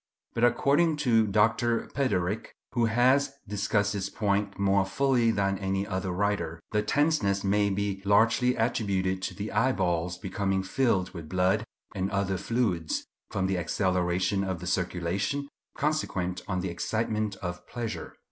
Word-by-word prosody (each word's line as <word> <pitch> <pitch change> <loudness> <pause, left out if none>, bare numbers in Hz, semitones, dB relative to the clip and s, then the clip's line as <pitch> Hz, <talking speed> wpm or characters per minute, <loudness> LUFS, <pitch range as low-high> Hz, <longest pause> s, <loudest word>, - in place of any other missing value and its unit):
But, 115 - -1
according 145 +6 +3
to 115 -3 +4
Dr. 115 +3 +2
Piderit, 105 -7 0 0.2
who 120 -2 +2
has 130 +5 +3
discussed 105 0 0
this 100 -1 -2
point 100 -1 -1
more 100 0 +3
fully 120 +3 +2
than 100 -3 +1
any 95 0 -1
other 95 -1 -3
writer, 90 -4 -1
the 105 - +2
tenseness 110 -6 +1
may 100 +1 +2
be 100 0 -2
largely 115 +5 +3
attributed 100 -5 0
to - - -4
the 105 +1 -5
eyeballs 90 -7 +1
becoming 95 0 -1
filled 95 -3 +1
with 85 -4 -8
blood 95 +3 +2 0.3
and 95 -1 -1
other 95 -1 0
fluids, 100 -9 -1 0.2
from 95 -2 -1
the 95 -1 0
acceleration 90 +2 0
of 95 -3 -2
the 90 - -7
circulation, 95 +9 -1 0.3
consequent 95 - -1
on 95 -2 -1
the 95 - -2
excitement 110 +3 -1
of 90 -1 -6
pleasure. 120 -2 -5
100 Hz, 145 wpm, -28 LUFS, 95-115 Hz, 0.3 s, to